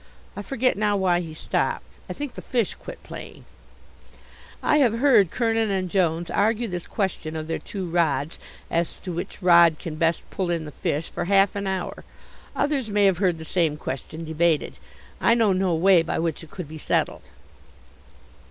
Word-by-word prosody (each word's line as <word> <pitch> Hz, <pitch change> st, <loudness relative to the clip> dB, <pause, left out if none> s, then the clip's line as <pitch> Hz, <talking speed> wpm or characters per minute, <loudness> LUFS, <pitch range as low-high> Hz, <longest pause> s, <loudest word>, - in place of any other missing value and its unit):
I 205 Hz, -, -4 dB
forget 250 Hz, +1 st, 0 dB
now 210 Hz, -1 st, +2 dB
why 180 Hz, -2 st, +2 dB
he 165 Hz, -2 st, -5 dB
stopped; -, -, -1 dB, 0.2 s
I -, -, -3 dB
think 290 Hz, -3 st, -5 dB
the -, -, -8 dB
fish 235 Hz, -6 st, -1 dB
quit -, -, -11 dB
playing. -, -, -10 dB, 1.2 s
I 300 Hz, -, +4 dB
have 240 Hz, -6 st, +3 dB
heard 235 Hz, -, +5 dB
Kernin 225 Hz, -1 st, +1 dB
and 185 Hz, -3 st, -1 dB
Jones 170 Hz, -3 st, +1 dB
argue 225 Hz, +3 st, +1 dB
this 180 Hz, -3 st, -5 dB
question 180 Hz, -6 st, -2 dB
of 155 Hz, -1 st, -3 dB
their 165 Hz, -, -3 dB
two 190 Hz, -3 st, -5 dB
rods, 160 Hz, -3 st, 0 dB, 0.3 s
as 170 Hz, 0 st, -1 dB
to 180 Hz, -, -5 dB
which 175 Hz, +3 st, -6 dB
rod 170 Hz, -3 st, +6 dB
can 155 Hz, -1 st, -6 dB
best 165 Hz, 0 st, 0 dB
pull 185 Hz, -2 st, -2 dB
in 165 Hz, -2 st, -1 dB
the 150 Hz, -, -8 dB
fish, 150 Hz, +3 st, -3 dB
for -, -, -3 dB
half 195 Hz, +1 st, +4 dB
an 200 Hz, -1 st, -3 dB
hour. 190 Hz, -1 st, -3 dB, 0.5 s
Others 275 Hz, -6 st, 0 dB
may 205 Hz, -1 st, +3 dB
have 190 Hz, -3 st, +3 dB
heard 180 Hz, -4 st, +2 dB
the 160 Hz, -, -8 dB
same 160 Hz, -3 st, +1 dB
question 155 Hz, +4 st, -6 dB
debated. 160 Hz, 0 st, +1 dB, 0.5 s
I 230 Hz, -, +4 dB
know 220 Hz, -4 st, +3 dB
no 185 Hz, -2 st, +1 dB
way 180 Hz, +1 st, +5 dB
by 165 Hz, -, -2 dB
which 165 Hz, -1 st, -2 dB
it 160 Hz, -, -12 dB
could 180 Hz, -2 st, -7 dB
be 155 Hz, +1 st, -9 dB
settled. -, -, 0 dB
180 Hz, 185 wpm, -24 LUFS, 165-205 Hz, 1.2 s, rod